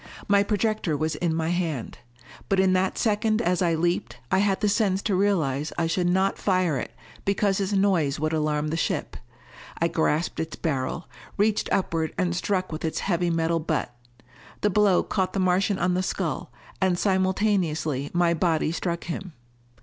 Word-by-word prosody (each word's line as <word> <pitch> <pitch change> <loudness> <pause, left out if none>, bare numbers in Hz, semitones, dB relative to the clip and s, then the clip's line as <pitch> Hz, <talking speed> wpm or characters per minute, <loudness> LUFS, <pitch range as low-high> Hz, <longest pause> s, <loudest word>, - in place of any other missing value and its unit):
My 200 0 +5
projector 205 -5 0
was 155 +2 -1
in 165 +2 -1
my 160 0 -1
hand. 165 -8 -2 0.5
But 195 - +2
in 190 -1 +4
that 185 0 +1
second 215 0 +1
as 180 -5 +1
I 170 -2 +2
leaped, 160 -8 -1
I 190 - +4
had 195 -1 +2
the 210 - +2
sense 200 -2 +2
to 210 - 0
realize 160 -8 +1
I 170 - +1
should 175 +2 +1
not 190 +2 +1
fire 185 -7 +1
it - - -5 0.3
because 200 0 +1
its 195 0 -1
noise 180 -8 +2
would 155 +1 -1
alarm 150 -1 0
the 160 - -2
ship. - - -2 0.6
I 170 - +3
grasped 160 0 0
its 160 0 -3
barrel, 140 +1 -2 0.3
reached 210 +1 +1
upward 165 -4 0
and 175 -1 0
struck 185 0 -1
with 155 - -5
its 160 - -2
heavy 175 -2 0
metal 165 0 +1
butt. 155 -6 -2 0.7
The 210 - +2
blow 205 -2 +4
caught 190 -2 -1
the 195 - -1
Martian 185 +2 +2
on 180 -1 +1
the 180 - +1
skull, 185 - -3 0.3
and 185 -2 +2
simultaneously 185 -7 +1
my 175 -1 +2
body 160 -2 +1
struck 170 0 -2
him. 175 +1 -5
180 Hz, 175 wpm, -25 LUFS, 160-195 Hz, 0.7 s, My